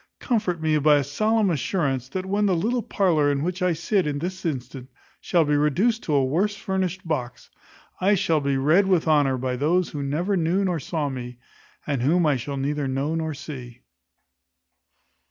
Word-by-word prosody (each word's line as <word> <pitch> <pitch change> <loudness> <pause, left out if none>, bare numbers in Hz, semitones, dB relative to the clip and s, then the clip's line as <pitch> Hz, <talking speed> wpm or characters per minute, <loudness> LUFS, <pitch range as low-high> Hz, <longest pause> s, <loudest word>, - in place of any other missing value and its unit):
Comfort 210 -9 -1
me 155 -1 +1
by 150 +1 +5
a 145 - +2
solemn 215 +7 +1
assurance, 135 -5 -1
that 185 +5 -4
when 205 +2 +1
the 190 - +2
little 230 +8 0
parlour 165 -10 +1
in 140 0 -1
which 180 +2 -3
I 180 -1 +2
sit 175 +2 0
at 145 -1 -2
this 185 +4 -5
instant 130 -2 -5 0.3
shall 170 -3 +2
be 150 0 +1
reduced 185 - +2
to 150 - 0
a 135 -2 +3
worse 190 +10 0
furnished 190 -2 -3
box, 125 -7 -4 0.5
I 200 +3 +3
shall 165 -5 +1
be 140 -1 0
read 160 +9 +3
with 180 -4 +2
honour 145 -4 +3
by 125 0 -2
those 170 +6 +1
who 145 - -5
never 160 +8 -1
knew 180 +3 +1
nor 175 -3 0
saw 150 +1 -2
me, 125 -2 -7 0.5
and 140 -4 -1
whom 165 +7 +2
I 150 -2 +3
shall 140 +4 -5
neither 140 +1 -1
know 135 +4 -1
nor 160 -2 -2
see. 125 -4 -9
155 Hz, 190 wpm, -24 LUFS, 140-185 Hz, 0.5 s, by